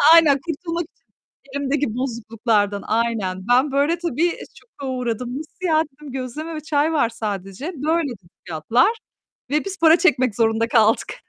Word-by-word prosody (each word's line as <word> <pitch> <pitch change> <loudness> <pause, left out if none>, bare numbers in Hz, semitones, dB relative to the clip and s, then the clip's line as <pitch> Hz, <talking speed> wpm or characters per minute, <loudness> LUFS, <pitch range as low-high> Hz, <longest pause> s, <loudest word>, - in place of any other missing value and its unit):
Aynen, 295 -5 +6
kurtulmak 335 +1 -3
için - - -42 0.5
elimdeki 280 +1 0
bozukluklardan. 225 -4 -1
Aynen. 215 -5 -1
Ben, 260 +3 +4
böyle, 290 +5 +2
tabii, 340 0 0 0.2
şoka 280 -11 -11
uğradım. 245 +1 -3
"Nasıl 315 +4 -7
ya?" 315 -1 +4
dedim, 290 -1 -11
"gözleme 270 +5 -5
ve 310 - -4
çay 305 +1 +1
var 285 -7 +2
sadece." 210 - -5
"Böyle." 315 +2 0
dedi 195 -9 -10 0.2
fiyatlar 225 - +2 0.6
ve 300 +2 +1
biz 390 0 -5
para 325 +1 +6
çekmek 255 - +3
zorunda 225 0 +2
kaldık. 225 -2 +3
265 Hz, 150 wpm, -22 LUFS, 225-315 Hz, 0.6 s, Aynen